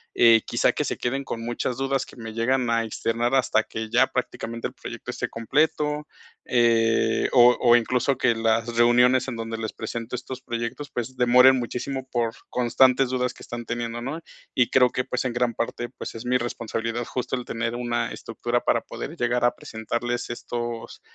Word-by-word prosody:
Eh, 115 -2 +6
quizá - - +2
que - - -1
se - - -2
queden 135 +3 -2
con 115 -3 -5
muchas 120 +1 -2
dudas 135 0 0
que - - -15
me 115 -3 -8
llegan 125 +2 +1
a 115 0 +2
externar 115 +2 -1
hasta 125 -4 +3
que 110 0 -6
ya 125 +3 +4
prácticamente 115 -2 -4
el - - -13
proyecto - - -8
esté - - -2
completo, 150 +5 0 0.4
eh, 115 -2 +2
o 125 -1 +6
o 120 -1 +6
incluso 125 +3 +2
que 120 -3 +2
las 115 +1 0
reuniones 125 +2 +5
en 130 - -4
donde 115 0 -4
les 110 -1 -4
presento 115 +1 -5
estos 125 +1 -7
proyectos, 120 +3 -5
pues, 125 +2 -4
demoren 125 +2 +6
muchísimo 130 +2 -4
por 115 -2 0 0.2
constantes 125 +1 +3
dudas 125 0 -1
que - - -17
están 120 0 -7
teniendo, 120 0 -3
¿no?, 145 +6 -4 0.3
y 125 -2 +2
creo 125 -2 +4
que, 125 - -1
pues, 125 +1 -3
en 125 - -1
gran 120 -1 0
parte, 120 +1 -3
pues, - - -8
es 115 +1 -8
mi 125 +1 +3
responsabilidad 115 -1 -3
justo 125 +1 -3
el 125 -1 -5
tener 115 0 -2
una 120 -1 -2
estructura 120 +1 -2
para - - +1
poder - - -7
llegar 120 0 0
a 120 - +2
presentarles 120 +2 -4
estos, 120 -1 -5
120 Hz, 185 wpm, -25 LUFS, 115-125 Hz, 0.4 s, Eh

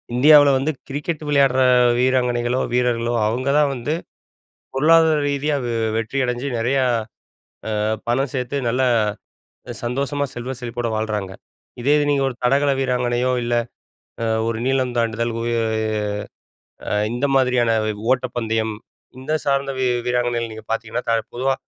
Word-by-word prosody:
இந்தியாவுல 145 +2 +7
வந்து 140 +4 0 0.2
கிரிக்கெட் 150 +3 -3
விளையாடுற 135 -2 +3 0.4
வீராங்கனைகளோ, 125 -1 +1
வீரர்களோ, 120 -1 +1
அவுங்க 130 +5 -1
தான் 145 - +3
வந்து 130 +5 -2 0.8
பொருளாதார 160 +2 +5
ரீதியா 145 +1 0
வெ 120 - -2 0.3
வெற்றி 115 +4 -3
அடஞ்சு 125 +2 -2
நெறையா, 130 +4 +1 0.9
அ - - -1 0.3
பணம் 135 +3 +1
சேத்து 130 0 -3
நல்லா 130 +2 +1 1.0
சந்தோஷமா 140 +4 -1
செல்வ 125 +2 -5
செழிப்போட 120 -1 -3
வாழ்றாங்க. 105 -3 -3 0.5
இதே 140 +4 +2
இது 145 - +2
நீங்க 140 -1 +2
ஒரு 130 - -5
தடகள 140 +3 +3
வீராங்கனையோ, 125 -1 0
இல்ல 120 0 -1 0.7
அ 115 - 0 0.2
ஒரு 115 -1 -2
நீளம் 130 -2 0
தாண்டுதல் 115 0 0
உய 120 0 0 1.3
அ - - -4 0.2
இந்த 125 +4 -1
மாதிரியான 125 -3 +3 0.2
வ் 105 -1 -3
ஓட்டப்பந்தயம், 115 -4 -2 0.5
இது 145 +4 -3
சார்ந்த 140 0 +1
வீ-வீராங்கனைகள் 120 -2 0
நீங்க 110 0 -10
பாத்தீங்கன்னா, 115 +2 -3
த - - +3 0.2
பொதுவா 135 +2 +1
125 Hz, 130 wpm, -21 LUFS, 120-140 Hz, 1.3 s, இந்தியாவுல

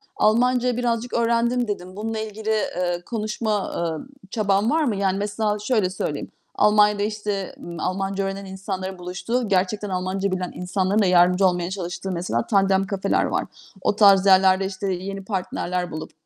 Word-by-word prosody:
"Almancayı 245 +2 +2
birazcık 240 0 -1
öğrendim." 235 +1 +1
dedin. 185 -3 -5
Bununla 220 +2 -3
ilgili, 220 0 -5
eee, 180 -5 0
konuşma, 215 -2 -2
eee, 165 +1 -2 0.3
çaban 205 0 +1
var 320 +1 +2
mı? 240 -8 0
Yani, 195 -1 0
mesela 210 +1 -1
şöyle 210 -3 +1
söyleyeyim. 155 -5 -4 0.2
Almanya'da 210 -1 +4
işte, 210 -2 -3
ııı, 170 - -7
Almanca 195 +2 -1
öğrenen 195 0 -4
insanların 190 0 -5
buluştuğu, 180 +7 -2
gerçekten 200 +2 0
Almanca 185 +1 -1
bilen 185 -1 -2
insanların 185 +3 0
da - - +3
yardımcı 180 +1 +4
olmaya 175 -1 -1
çalıştığı, 190 0 -4
mesela 170 -10 -2
Tandem 195 -1 +2
kafeler 195 -1 0
var. - - -1 0.4
O 205 - +1
tarz 200 -2 +6
yerlerde, 190 0 +5
işte, 195 +1 -4
yeni 195 +2 -5
partnerler 180 -3 -2
bulup, 155 0 -6
195 Hz, 155 wpm, -23 LUFS, 185-215 Hz, 0.4 s, tarz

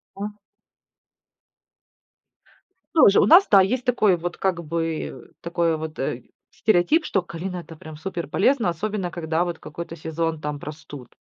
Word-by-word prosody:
А. 205 +2 -4 2.6
Тоже. 205 -11 +6
У - - +5
нас, 355 +5 +7
да, 200 -2 +7
есть 245 +7 0
такой 215 -6 +3
вот, 175 +1 -5
как 180 -3 -1
бы, 165 0 -2
э, - - -8 0.2
такой 170 -1 0
вот, 155 0 -7
э, 130 -2 -3 0.3
стереотип, 215 - +2
что 195 - +1
калина 180 +1 -6
это 170 -2 -9
прям 155 0 -11
супер 170 0 -5
полезно, 210 - +2
особенно 185 +1 -3
когда 165 -1 -1
вот 175 -1 -4
какой-то 165 +2 -8
сезон 160 0 -3
там 150 -1 -4
простуд. 145 -4 -10
170 Hz, 150 wpm, -23 LUFS, 160-195 Hz, 2.6 s, нас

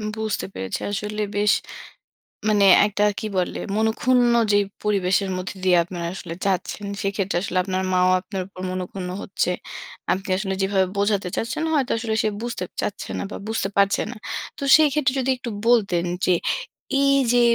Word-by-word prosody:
বুঝতে 220 -1 -2
পেরেছি। 95 0 -4
আসলে 210 +1 -3
বেশ। 205 0 +3 1.0
মানে 205 -2 +4 0.2
একটা 205 0 0 0.2
কি - - -5
বলে? 180 - -1 0.2
মনক্ষুন্ন 240 +3 +3 0.2
যেই 205 0 +4 0.2
পরিবেশের 195 -1 +1
মধ্যে 185 +2 -5
দিয়ে 180 -2 +5
আপনারা 175 -1 -6
আসলে 175 -3 -7
যাচ্ছেন 195 +2 -1 0.2
সেক্ষেত্রে 195 -3 -1
আসলে 185 -1 -2
আপনার 190 0 -2
মা 185 - +3
ও - - +4
আপনার 195 -2 -5
উপর 195 -1 -11
মনক্ষুন্ন 185 0 -4
হচ্ছে। 185 -2 -1 0.6
আপনি 190 +1 -5
আসলে 190 -1 -2
যেভাবে 195 -1 +2
বোঝাতে 200 -2 +1
চাচ্ছেন 230 +7 -2
হয়তো 275 -5 +1
আসলে 225 -1 -2
সে 215 - +2
বুঝতে 235 -5 -3 0.2
চাচ্ছে 205 - -4
না - - -2
বা - - -5
বুঝতে 220 -3 -1
পারছে 200 0 +3
না। - - -8 0.4
তো - - -6
সেই 310 -1 +6
ক্ষেত্রে 280 -4 +2
যদি 260 0 -1
একটু 245 -1 -6 0.2
বলতেন 195 -8 +3 0.2
যে 185 - +4 0.7
এই 275 0 +4 0.2
যে 245 - +5
200 Hz, 170 wpm, -23 LUFS, 185-220 Hz, 1.0 s, সেই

